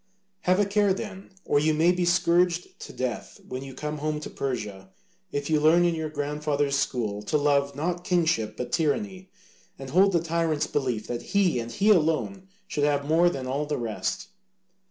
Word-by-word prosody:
Have 185 +2 +3
a 205 - +4
care 200 -1 +2
then, 195 -1 -7 0.2
or 145 - +3
you 155 +1 +2
may 165 +3 +4
be 180 0 0
scourged 175 0 +2
to - - -10
death 125 -3 -4
when 130 0 -5
you 135 -1 -9
come 150 +2 -4
home 155 0 -2
to - - -7
Persia, 105 -8 -4 0.4
if 145 0 -3
you 155 -1 +2
learn 165 +3 +5
in 170 - +2
your 160 -1 -3
grandfather's 145 -1 -1
school 110 -7 -1
to 105 +8 0
love 140 -1 +1
not 175 +4 -2
kingship 160 -12 +1
but 125 -1 -5
tyranny, 185 - -1 0.5
and 135 -1 -8
hold 195 +4 +4
the 170 - +4
tyrant's 165 -2 0
belief 125 -8 -2
that 120 -1 -4
he 190 -10 +1
and 115 0 -5
he 205 - +3
alone 185 +2 +1 0.2
should 150 -7 -2
have 145 -1 +1
more 165 +4 +4
than 135 -6 -5
all 140 +3 -2
the 150 - -1
rest." 115 -3 -3
150 Hz, 190 wpm, -26 LUFS, 135-175 Hz, 0.5 s, learn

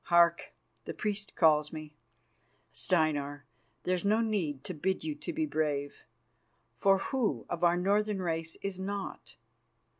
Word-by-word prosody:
Hark! 170 -1 +4 0.3
the - - -5
priests 210 -1 -2
call 155 -3 +5
me. 155 -1 -8 0.8
Steinar, 145 -4 +1 0.4
there's 180 -1 0
no 210 +2 +3
need 180 -12 -1
to 185 - -4
bid 190 +4 -1
you 310 - -2
to 300 +3 -5
be 315 -1 0
brave, 145 - -2 0.7
for 195 +4 +5
who 250 +3 -1
of 175 0 -2
our 175 0 +5
Northern 205 +2 +1
race 165 -2 -2
is 195 -2 -3
not? 200 +1 -5
180 Hz, 140 wpm, -31 LUFS, 155-205 Hz, 0.8 s, call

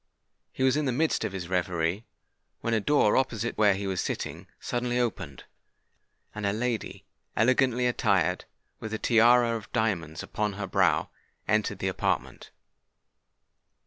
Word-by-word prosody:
He - - -3
was 130 0 +4
in 150 0 0
the 130 - +1
midst 155 +6 +1
of - - -2
his 95 -3 -5
reverie, 90 +2 -1 0.5
when 115 - -1
a 110 - +3
door 110 -2 +3
opposite 120 -3 0
to - - -22
where 105 -2 +4
he 100 +1 -4
was 95 -2 -1
sitting, - - -4
suddenly 120 0 -2
opened; 120 -3 -3 0.9
and 105 - -6
a 100 - +1
lady, 115 +1 -3 0.3
elegantly 125 +1 +3
attired, 100 -8 +1 0.3
with 110 0 -4
a - - -2
tiara 120 +1 +4
of 110 -2 -8
diamonds 85 -8 -1
upon 105 -1 -2
her 100 0 -4
brow, 95 - +1 0.4
entered - - +1
the - - -2
apartment. - - -2
110 Hz, 150 wpm, -27 LUFS, 100-125 Hz, 0.9 s, was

